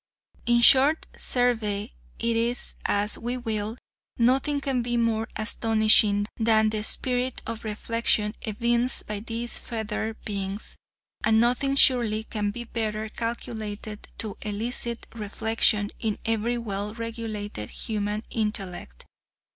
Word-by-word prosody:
In 240 0 +4
short, 275 +6 +6
survey 220 -4 +1 0.2
it 235 +1 0 0.2
as 205 +1 +1
we 245 +2 -2
will, 220 -2 -3 0.4
nothing 265 +4 +3
can 270 -3 0
be 240 0 -1
more 225 -1 +1
astonishing 215 -1 +4
than 220 -1 +4
the 215 -1 -1
spirit 250 +2 0
of 230 -1 -5
reflection 215 0 0
evinced 235 +3 +1
by 210 -1 -4
these 230 +2 -3
feathered 220 -1 -3
beings, 200 0 -4 0.5
and 220 0 +4
nothing 250 +4 +2
surely 235 -5 +4
can 210 -2 -2
be 240 +4 -5
better 220 -2 -2
calculated 215 -2 -5
to 215 -3 -2
elicit 230 +3 -3
reflection 215 -1 +1
in 220 -2 -1
every 225 +2 +1
well 210 -2 -4
regulated 220 - -5
human 210 0 -2
intellect. 195 - -3
225 Hz, 115 wpm, -26 LUFS, 210-235 Hz, 0.5 s, short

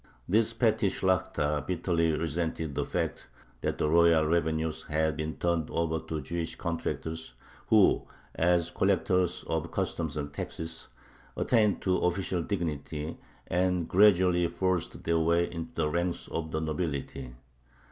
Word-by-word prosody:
This 110 +4 +3
petty 110 -3 +2
Shlakhta 75 -6 0
bitterly 85 -2 +1
resented 80 0 -2
the - - -1
fact - - -3 0.3
that - - -1
the - - +1
royal 85 0 +5
revenues 80 -1 0
had 80 -1 0
been 80 +1 -4
turned 85 -3 0
over 80 -1 0
to 80 -1 -5
Jewish 85 +4 -3
contractors, 80 -4 -4 0.3
who, - - +4 0.3
as 85 0 +2
collectors 90 -2 +1
of 80 +1 -2
customs 85 -5 -2
and 70 -1 -4
taxes, 80 +2 -5 0.5
attained 110 -5 +2
to 90 -1 +2
official 90 0 0
dignity, 80 -4 -3 0.3
and 90 -1 +1
gradually 90 -3 +5
forced 90 0 -1
their 85 0 +2
way 85 +2 +2
into 85 +7 -6
the 80 -2 +1
ranks 85 +3 -1
of 80 -1 -3
the 80 - -2
nobility. 70 -5 -3
85 Hz, 135 wpm, -29 LUFS, 80-90 Hz, 0.5 s, royal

